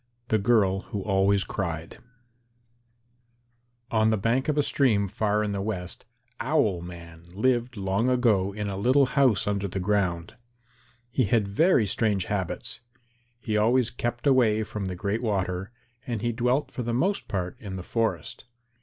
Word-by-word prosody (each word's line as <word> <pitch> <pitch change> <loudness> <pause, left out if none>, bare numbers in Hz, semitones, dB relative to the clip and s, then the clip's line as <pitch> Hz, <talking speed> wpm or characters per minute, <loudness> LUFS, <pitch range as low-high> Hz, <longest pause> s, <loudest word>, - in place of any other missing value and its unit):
THE 110 - +3
GIRL 100 -3 +3
WHO 100 -2 -4
ALWAYS 100 -1 +2
CRIED 85 -5 -4 1.9
On 110 -1 +3
the 110 - +2
bank 115 +8 0
of 150 - 0
a 145 - +4
stream 110 -9 +2
far 105 +2 0
in 105 - -2
the 100 -1 -2
West, 95 -3 -4 0.3
Owl 120 - +1
man 85 -1 -10
lived 120 +1 +1
long 100 +5 0
ago 110 -7 +2
in 105 +1 -4
a 100 -1 -3
little 130 +7 +4
house 130 -5 +3
under 100 -1 -1
the 95 +1 -4
ground. 90 -3 -1 0.7
He 130 0 +2
had 105 0 +2
very 125 - +3
strange 100 -2 0
habits. 100 -5 -3 0.6
He 110 -2 -3
always 120 +3 +3
kept 120 +1 -4
away 120 -6 +4
from 105 -2 -5
the 95 -1 -4
Great 100 +5 -2
Water 95 -3 -2 0.4
and 115 -4 -3
he 120 - +1
dwelt 125 +4 0
for - - -5
the 120 -1 -2
most 190 +10 0
part 90 -2 -3
in 100 -3 -7
the 90 - -6
forest. 115 +2 -2
105 Hz, 160 wpm, -26 LUFS, 95-120 Hz, 1.9 s, a